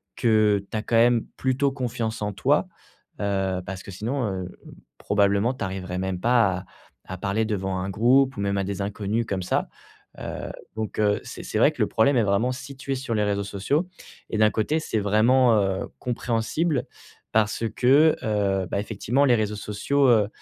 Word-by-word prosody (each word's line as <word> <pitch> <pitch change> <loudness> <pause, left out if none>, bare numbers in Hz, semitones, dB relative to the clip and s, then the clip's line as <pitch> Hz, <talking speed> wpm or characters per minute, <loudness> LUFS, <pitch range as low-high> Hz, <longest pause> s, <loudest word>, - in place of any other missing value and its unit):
que 105 -3 +3
tu 110 - -2
as 105 - -3
quand 115 - -1
même 120 0 +4
plutôt 130 +1 +1
confiance 120 -4 -3
en 105 0 -1
toi. 140 - +1 0.5
Heu, 95 -2 -1
parce 95 -1 -6
que 100 - -9
sinon, 120 +8 -3 0.2
heu, 90 - -7 0.5
probablement 100 +4 +2
tu 130 - -6
arriverais 95 -1 -5
même 95 -1 -2
pas 115 -6 +3
à 90 - -12 0.4
à 95 - -7
parler 100 +4 -1
devant 95 -3 -2
un 95 - -3
groupe 130 +6 +3
ou - - -2
même 100 0 0
à - - 0
des 100 0 -4
inconnus 105 +3 -2
comme 95 -2 -2
ça. - - 0 0.5
Heu, - - -5 0.2
donc, 110 -1 -4
heu, 105 -1 +2
c'est - - -8
c'est - - -3
vrai - - +5
que - - -6
le - - +3
problème 130 +5 +3
est 115 - +4
vraiment 100 +5 +1
situé 135 +1 -6
sur 125 -3 -3
les 105 - +1
réseaux 100 -1 0
sociaux 120 - -1 0.4
et 110 - -2
d'un 110 0 +4
côté, 150 +9 0
c'est 110 - -2
vraiment, 115 +4 +4
heu, 95 -1 -1
compréhensible 125 +5 -1 0.5
parce 110 +1 +1
que, 145 +5 +5
heu, 100 -4 0
ben, - - 0
effectivement 115 +6 0
les 125 - +4
réseaux 105 -1 -1
sociaux, 130 +8 0
heu, 110 -4 +4
110 Hz, 190 wpm, -24 LUFS, 100-125 Hz, 0.5 s, vrai